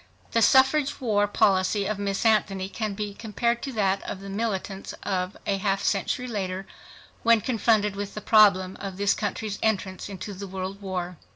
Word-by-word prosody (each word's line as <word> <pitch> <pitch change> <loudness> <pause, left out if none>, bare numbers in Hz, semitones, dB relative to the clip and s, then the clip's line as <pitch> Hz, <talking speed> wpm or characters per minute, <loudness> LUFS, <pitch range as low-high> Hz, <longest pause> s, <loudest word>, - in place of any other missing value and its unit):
The 230 - +2
suffrage 265 +5 +4
war 210 -5 +2
policy 195 0 +2
of 210 0 -2
Miss 200 +1 -2
Anthony 195 -3 +2
can 210 0 -3
be 205 0 -4
compared 235 +3 -1
to 275 - -4
that 195 -3 +1
of - - -6
the 195 0 -8
militants 200 -2 -3
a 190 +1 -2
half 195 0 0
century 210 +5 0
later 190 -4 -3 0.6
when 230 -1 +5
confronted 215 -3 +1
with 200 0 -5
the - - -3
problem 195 -4 +4
of 195 -2 -6
this 200 0 +3
country's 210 0 -3
entrance 195 -3 -1
into 200 +1 -6
the 195 +1 -7
world 190 +1 -5
war. 180 -3 -4
200 Hz, 170 wpm, -26 LUFS, 195-215 Hz, 0.6 s, when